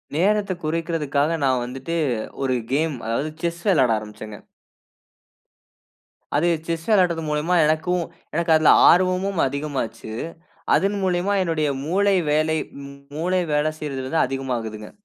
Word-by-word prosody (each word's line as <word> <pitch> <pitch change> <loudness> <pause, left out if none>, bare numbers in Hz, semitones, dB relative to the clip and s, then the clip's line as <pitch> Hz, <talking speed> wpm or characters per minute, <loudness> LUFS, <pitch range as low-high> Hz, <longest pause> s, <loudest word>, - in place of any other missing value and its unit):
நேரத்த 200 +4 +2
குறைக்கிறதற்காக 155 -2 0
நான் 130 -2 +2
வந்துட்டு 135 +7 -4 0.5
ஒரு 130 -1 +1 0.2
கேம், 155 +1 +1
அதாவது 125 +7 -1
செஸ் 170 0 -2
விளையாட 135 - +4
ஆரம்பிச்சேங்க. 105 0 -9 2.0
அது 155 +4 +2 0.2
செஸ் 165 -1 -3
விளையாடுறது 180 -6 +3
மூலமா 150 +4 0
எனக்கும் 160 +3 +1 0.3
எனக்கு 170 +1 0
அதில 155 -1 +6 0.2
ஆர்வமும் 185 +1 +2
அதிகமாச்சு. 140 -5 -4 0.6
அதன்மூலியமா 195 -1 +1
என்னுடைய 160 -4 0 0.2
மூளை 195 +4 +2 0.2
வேலை 155 +1 +2 0.6
மூளை 180 +3 +1
வேல 150 +1 +2
செய்றது 135 -3 -4
வந்து 160 +4 0
அதிகமாகுதுங்க. 120 -5 -4
160 Hz, 110 wpm, -22 LUFS, 135-180 Hz, 2.0 s, அதில